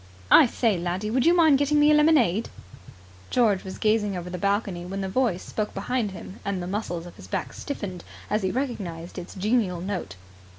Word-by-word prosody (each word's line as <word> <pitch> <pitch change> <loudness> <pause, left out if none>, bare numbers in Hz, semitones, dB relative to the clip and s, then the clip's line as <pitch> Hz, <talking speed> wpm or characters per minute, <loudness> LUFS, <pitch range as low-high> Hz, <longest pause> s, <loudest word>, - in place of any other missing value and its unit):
"I - - +9
say, 225 -5 +1
laddie, 180 +5 -2
would 260 +4 +2
you 345 - +6
mind 315 -5 +5
getting 290 +1 +2
me 295 +1 +6
a - - +6
lemonade?" 285 - +3 0.8
George 215 -6 +2
was 190 - -7
gazing 215 -3 +1
over 180 0 -6
the 180 - -5
balcony 200 -2 -1
when 195 +2 -5
the 190 - -2
voice 200 -3 0
spoke 215 -1 -4
behind 220 +2 -1
him, 190 +1 -10
and 200 -2 -2
the 175 - -4
muscles 180 -3 -3
of 175 - -12
his - - -12
back - - -3
stiffened 195 - -6 0.2
as 210 +1 0
he 190 - 0
recognized 185 -10 -4
its 175 - -9
genial 200 -2 +1
note. 180 - -4
200 Hz, 200 wpm, -25 LUFS, 180-245 Hz, 0.8 s, I